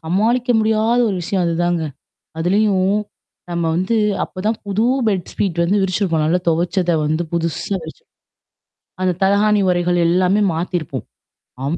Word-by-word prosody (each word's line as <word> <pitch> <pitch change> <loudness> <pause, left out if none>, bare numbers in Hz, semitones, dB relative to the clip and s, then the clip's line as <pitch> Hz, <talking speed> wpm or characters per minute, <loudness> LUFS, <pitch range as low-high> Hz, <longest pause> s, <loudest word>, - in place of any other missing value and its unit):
சமாளிக்க 225 +9 0
முடியாத 220 +2 +2
ஒரு 195 - -1
விஷயம் 180 +1 -1
அதுதாங்க. 170 0 0 0.6
அதுலயும் 190 +2 +2 0.6
நம்ம 170 -1 -1
வந்து 185 +6 0 0.3
அப்பதான் 210 +4 -3
புது 200 +2 0 0.2
பெட் 190 -4 -1
ஸ்பீட் 180 -4 -1
வந்து 200 +3 +2
விரிச்சிருப்போம். 185 -4 0
நல்லா 170 +4 +1
துவைச்சத 175 +2 +1 0.2
வந்து 155 +3 0
புதுசா 170 +3 -2
விரிச்சிருப்போம். 160 0 -12 0.9
அந்த 185 -1 +2
தலகாணி 205 +2 +3
உறைகள் 175 0 +1
எல்லாமே 185 +3 +2
மாத்திருப்போம். 170 -1 -3 0.6
அம், 160 +5 -1
185 Hz, 125 wpm, -19 LUFS, 170-205 Hz, 0.9 s, தலகாணி